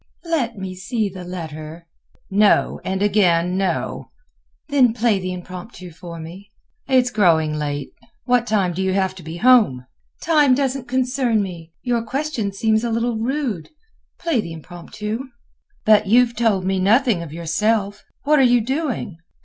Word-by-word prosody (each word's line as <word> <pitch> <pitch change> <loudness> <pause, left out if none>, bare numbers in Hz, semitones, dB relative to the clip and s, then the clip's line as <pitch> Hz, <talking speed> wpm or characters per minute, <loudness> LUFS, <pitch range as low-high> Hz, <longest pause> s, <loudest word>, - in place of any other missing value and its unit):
"Let 280 -10 -1
me 190 -1 -5
see 200 +4 -2
the 185 -1 -9
letter." 165 -2 -7 0.5
"No, 205 +1 +3
and 190 +1 -1
again, 180 -4 +2
no." 190 -2 -2 0.6
"Then 255 -5 +4
play 225 -4 +2
the 185 0 -4
Impromptu 180 +1 -9
for 170 0 -9
me." 180 +5 -10 0.4
"It 265 - +1
is 250 -1 +2
growing 165 -8 +3
late; 145 -2 -3 0.3
what 245 -1 +2
time 195 -5 +1
do 185 - -3
you 190 0 0
have 190 -1 0
to - - -9
be 165 +1 -7
home?" 215 - +4 0.3
"Time 300 -5 +4
doesn't 270 -2 -2
concern 250 -3 +1
me. 170 -4 -8
Your 240 -2 0
question 250 -3 -3
seems 220 +2 +1
a 235 - -1
little 230 0 -1
rude. 240 - -2 0.5
Play 325 -9 0
the 170 - -7
Impromptu." 195 +7 -6 0.7
"But 215 -1 +5
you 245 +5 +6
have 235 -1 -11
told 210 -6 +1
me 190 0 0
nothing 220 0 +3
of 165 -3 -8
yourself. 200 +5 -1 0.2
What 300 +1 +4
are - - +6
you 245 -2 +5
doing?" 250 - -3
210 Hz, 160 wpm, -21 LUFS, 180-245 Hz, 0.7 s, you